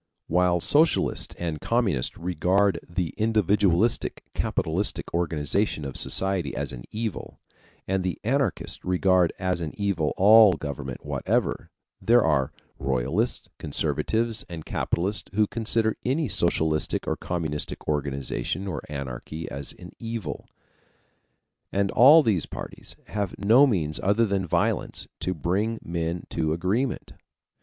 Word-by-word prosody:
While 90 +1 +2
socialists 155 - +3
and 80 -3 -4
communists 110 - 0
regard 90 +2 +1
the 85 -2 -2
individualistic, 105 -1 +2
capitalistic 90 +6 -1
organization 80 0 0
of 70 - -6
society 95 -8 +1
as - - -3
an - - -9
evil, 110 -2 -5 0.5
and 95 0 0
the 90 -1 -3
anarchists 130 - -1
regard 90 -1 +3
as 90 -2 -1
an 80 -2 -5
evil 95 -7 0
all 105 0 +8
government 70 -4 -6
whatever, - - -1 0.3
there 120 0 +4
are 70 -4 +1 0.3
royalists, 70 - -1
conservatives, 110 +9 -1
and 80 -3 -7
capitalists 100 +5 -1
who 105 0 +4
consider 110 0 0
any 140 +4 0
socialistic 80 -5 +1
or - - -1
communistic 80 -4 -3
organization 70 +4 -2
or 90 - -3
anarchy 70 +3 -6
as 70 +1 -2
an - - -12
evil, 115 -7 -5 1.2
and 100 0 0
all 145 +7 +8
these 100 - +1
parties - - -6
have 100 -3 -3
no 115 +8 +5
means 80 - 0
other 105 +4 +3
than 100 -3 -1
violence - - -1
to 90 - -1
bring 100 +8 -1
men 85 0 -3
to 80 -1 0
agreement. 100 +10 -1
90 Hz, 125 wpm, -25 LUFS, 80-105 Hz, 1.2 s, all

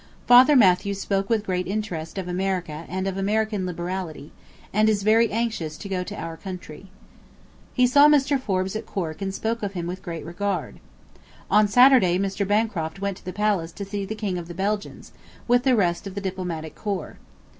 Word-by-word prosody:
Father 255 +4 +7
Mathew 200 -3 +4
spoke 195 0 -2
with 220 -2 +1
great 180 -2 -2
interest 190 -5 -4
of 190 -2 -4
America 180 -3 -2
and 185 +1 -3
of 190 0 -3
American 210 -1 0
liberality, 175 -3 -5 0.4
and 215 +2 +4
is 205 -2 0
very 225 +2 +4
anxious 215 -9 -2
to - - -8
go 185 -2 -2
to 205 +3 -7
our 165 0 -5
country. 185 -2 -9 0.9
He 250 - +4
saw 285 +4 +6
Mr. 280 -2 +3
Forbes 190 -4 -1
at 220 - -5
Cork 165 -5 -4
and 195 0 -2
spoke 225 +4 -2
of 200 -1 -3
him 175 -3 -4
with 180 +2 -5
great 170 -4 -6
regard.... 200 +4 -3 0.7
On 210 0 +5
[Saturday] 245 -5 +6
Mr. 195 +1 -1
Bancroft 205 -5 -1
went 200 -1 -3
to - - -18
the 185 - -4
palace 200 -5 0
to 200 - -6
see 200 0 -4
the 215 +3 -5
King 200 -4 -3
of 170 - -8
the 175 - -8
Belgians, 205 +3 -3 0.4
with 245 0 +4
the 260 -2 +4
rest 180 -3 0
of 195 - -8
the 200 - -3
Diplomatic 180 -5 -4
Corps. 200 -6 -5
195 Hz, 190 wpm, -24 LUFS, 180-215 Hz, 0.9 s, Father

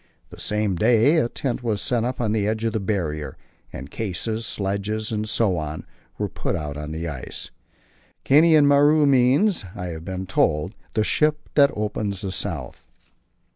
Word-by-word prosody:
The - - -12
same 105 -3 0
day 120 - +4
a 120 -7 +2
tent 130 -1 -3
was 110 -4 -1
set 120 0 0
up 125 +1 -3
on 110 -3 0
the 105 -2 +1
edge 110 +1 -1
of 115 - 0
the 110 - 0
Barrier, 85 -7 -3 0.3
and 65 +3 -8
cases, 110 +2 -3
sledges, 105 +2 -2
and 110 0 -2
so 105 -5 +2
on, 75 0 -5 0.3
were - - -1
put - - -3
out 75 -2 -4
on 75 +1 -6
the 80 +2 -4
ice. 70 -6 -7 0.7
Kainan 155 +1 +6
Maru 145 +2 +5
means, 140 - +3
I 90 0 -5
have 80 -1 -7
been 95 +1 -5
told, 90 -1 +1 0.2
"the 110 - +3
ship 150 +6 +1
that 140 -1 +6
opens 105 -2 -2
the 95 - -3
South." - - -5
110 Hz, 175 wpm, -23 LUFS, 95-125 Hz, 0.7 s, Kainan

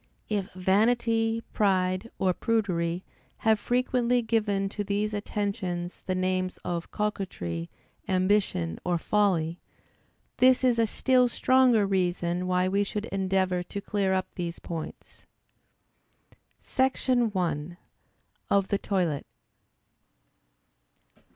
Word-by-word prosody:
If 205 -3 -2
vanity, 225 +4 +2
pride, 185 +1 +1
or 185 -1 +2
prudery, 180 -6 0 0.4
have 220 -1 +4
frequently 245 0 +1
given 210 -3 +1
to 205 +1 -4
these 205 +1 -1
attentions 200 -4 -3
the 185 - 0
names 185 0 -1
of 170 -1 -3
coquetry, 180 - -3 0.4
ambition, 185 - +1
or 175 -1 +1
folly, 175 -4 +1 0.8
this 255 +1 +5
is 245 -2 +3
a 225 - +3
still 250 +3 +3
stronger 250 -3 +4
reason, 180 -2 0
why 180 0 +2
we 200 +2 +2
should 210 +1 -3
endeavor 190 -2 +1
to 180 +3 -6
clear 200 -1 -1
up 185 0 +1
these 170 -1 -4
points. 165 -2 -8 1.4
SECTION 255 -3 +1
I. 170 -2 -2 0.7
_Of 200 -1 +2
the 200 - +1
toilet. 175 -9 -1
195 Hz, 105 wpm, -27 LUFS, 180-220 Hz, 1.4 s, this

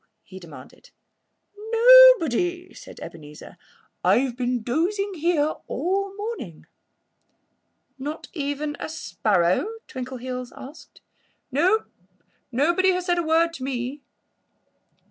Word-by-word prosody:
he 190 - -12
demanded. 145 -7 -14 0.8
"Nobody!" 450 - +6
said - - -13
Ebenezer. 150 -2 -11 0.5
"I've 255 -1 +2
been 245 -2 -2
dozing 385 - -1
here 320 -3 +1
all 385 +7 -1
the 390 - -15
morning." 410 - -7 1.3
"Not 295 +4 -6
even 290 -1 -3
a - - -5
sparrow?" 200 - 0 0.2
Twinkleheels 255 -1 -6
asked. 280 +5 -13 0.5
"No! 365 - +2 0.7
Nobody 340 +9 +2
has 360 0 -3
said 350 -1 +1
a - - 0
word 330 +1 +2
to 270 - -8
me." 260 +2 -4
295 Hz, 105 wpm, -24 LUFS, 250-360 Hz, 1.3 s, Nobody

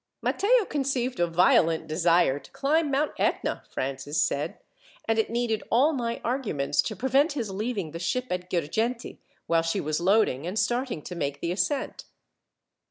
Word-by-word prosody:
"Matteo 450 +2 +3
conceived 265 - -1
a 175 - +3
violent 165 -1 +3
desire 165 -3 +2
to 135 - -17
climb 290 +3 +1
Mount 280 +2 +1
Etna," - - 0
Francis 135 +3 -3
said, 145 -1 0 0.5
"and 225 0 +2
it 220 - +1
needed 230 -2 -1
all 275 +7 +4
my 235 -4 -2
arguments 220 - 0
to 215 - -4
prevent 270 - +2
his 235 -8 -3
leaving 200 -4 -3
the 165 - -6
ship 250 +8 -1
at 180 0 -3
Girgenti, 220 +9 -2 0.3
while 165 0 +2
she 165 +4 -1
was 155 -1 -1
loading, 180 -6 +2
and 185 +4 -4
starting 240 - -1
to 180 - -7
make 140 -5 -3
the 170 - -2
ascent." 190 +10 -2
210 Hz, 165 wpm, -26 LUFS, 165-255 Hz, 0.5 s, all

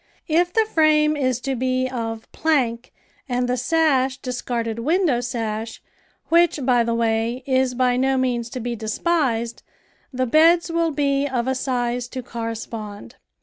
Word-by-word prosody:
If 345 +2 +2
the 445 +3 +2
frame 305 -4 +3
is 255 -4 0
to 270 0 -2
be 255 +1 0
of 225 -3 -5
plank 255 -7 0 0.4
and 245 0 0
the 250 - +1
sash 265 -1 +2
discarded 240 -3 -3
window 310 0 +2
sash, 225 -2 -4 0.5
which, 335 -1 +4
by 245 -2 +4
the 230 0 -1
way, 230 +2 0
is 260 -1 +1
by 250 0 +2
no 265 +1 +2
means 245 -2 -1
to - - -3
be 240 0 -3
despised, 235 0 -1 0.5
the 255 -1 -1
beds 330 +6 +4
will 335 0 +1
be 280 -2 0
of 255 -3 -2
a 265 - +1
size 245 -2 -2
to 255 0 -6
correspond. 225 - -6
255 Hz, 150 wpm, -22 LUFS, 235-290 Hz, 0.5 s, which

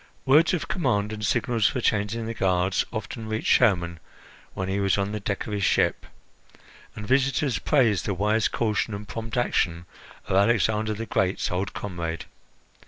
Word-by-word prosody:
Words 155 +7 +5
of 165 - -4
command 105 - 0
and 105 0 -6
signals 115 -1 +1
for - - -1
changing 110 0 0
the 115 - -3
guards 95 -2 +1
often 110 0 -5
reached 110 0 +2
Hermon 85 -4 +2 0.6
when 95 - -3
he 95 +1 -1
was 100 0 +2
on 100 0 -1
the 105 - -3
deck 100 +1 -3
of 110 - -5
his 100 -1 -1
ship, - - +1 0.9
and 105 - -7
visitors 135 +1 +1
praised 120 -10 +2
the 100 - -1
wise 105 +3 +2
caution 110 -1 -1
and 100 +1 -8
prompt 115 +2 -5
action 85 -8 0 0.4
of - - -1
Alexander 110 +1 +2
the 115 +2 -5
Great's 95 -3 0
old 95 +4 -2
comrade. 85 -4 -4
105 Hz, 170 wpm, -25 LUFS, 95-115 Hz, 0.9 s, Words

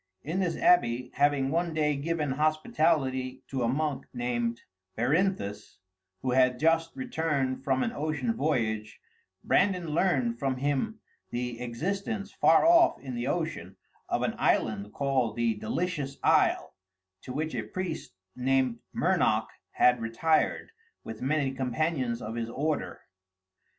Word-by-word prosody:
In 165 +6 -2
this 180 -3 0
abbey, 125 - +3
having 140 -1 +2
one 170 0 0
day 150 -1 +2
given 150 0 -1
hospitality 140 -3 0
to 135 -2 -2
a 120 - +2
monk 140 +1 -1
named 120 -1 -1 0.4
Berinthus, 120 - 0 0.5
who 130 - 0
had 125 0 +4
just 165 +3 +2
returned 150 - -1
from 130 -1 +1
an 230 - -1
ocean 145 - -1
voyage, 110 -7 -1 0.4
Brandan 185 -4 +2
learned 140 -8 +1
from 135 -2 -1
him 145 - -1 0.3
the 120 -1 -4
existence, 200 - -3
far 160 - +4
off 340 0 +5
in 130 -2 -7
the 120 +1 -3
ocean, 150 - -3 0.3
of - - 0
an - - 0
island 105 -1 +1
called 130 -5 0
The 120 -1 +1
Delicious 140 +5 -3
Isle, - - +3 0.5
to - - -8
which 155 +4 -2
a - - -1
priest 180 - -5 0.2
named 130 -2 +1 0.2
Mernoc - - +2 0.2
had 125 -1 +3
retired, 135 - +1 0.3
with 110 -1 -8
many 140 +1 +1
companions 130 -1 -1
of 110 - -5
his 115 0 -3
order. 150 +5 -2
135 Hz, 135 wpm, -28 LUFS, 120-160 Hz, 0.5 s, off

